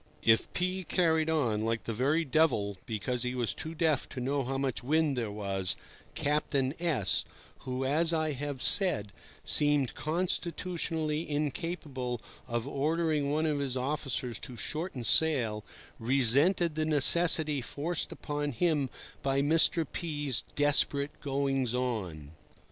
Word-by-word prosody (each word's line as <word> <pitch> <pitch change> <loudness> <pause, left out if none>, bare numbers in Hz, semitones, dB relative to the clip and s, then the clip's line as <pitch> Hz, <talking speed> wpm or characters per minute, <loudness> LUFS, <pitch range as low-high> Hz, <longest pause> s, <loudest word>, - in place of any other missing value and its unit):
If 110 0 +3
P— 185 +1 -2
carried 160 -2 +1
on 120 -10 0
"like 115 0 -2
the 115 - -4
very 145 +8 0
devil" 130 -9 +1
because 120 +3 -3
he 125 +1 -3
was 120 -3 -1
too 160 +1 -7
deaf 155 -4 0
to 130 - -7
know 135 +2 -1
how 135 +2 -3
much 135 -3 -2
wind 155 +1 +1
there 115 -4 -3
was, 100 -3 -3 0.4
Captain 140 -2 -1
S— 145 - +1 0.4
(who, 130 +1 -3
as 160 +5 +2
I 155 -2 0
have 140 -1 -5
said, 160 - +4 0.3
seemed 145 -3 +2
constitutionally 165 -1 -2
incapable 145 -4 -3 0.3
of 120 +1 -3
ordering 150 +1 -1
one 155 +2 0
of 150 -2 0
his 135 -2 -2
officers 130 -3 -1
to 125 -4 -7
shorten 150 - -3
sail) 115 -5 +2 0.4
resented 140 - +2
the 155 +1 -1
necessity 155 0 +6
forced 150 +8 -2
upon 145 -1 -4
him 150 -2 0 0.3
by 135 0 0
Mr. 160 +2 +3
P—'s 145 -7 0
desperate 145 0 +3
goings 135 -3 -1
on. 95 - -4
140 Hz, 135 wpm, -29 LUFS, 125-160 Hz, 0.4 s, necessity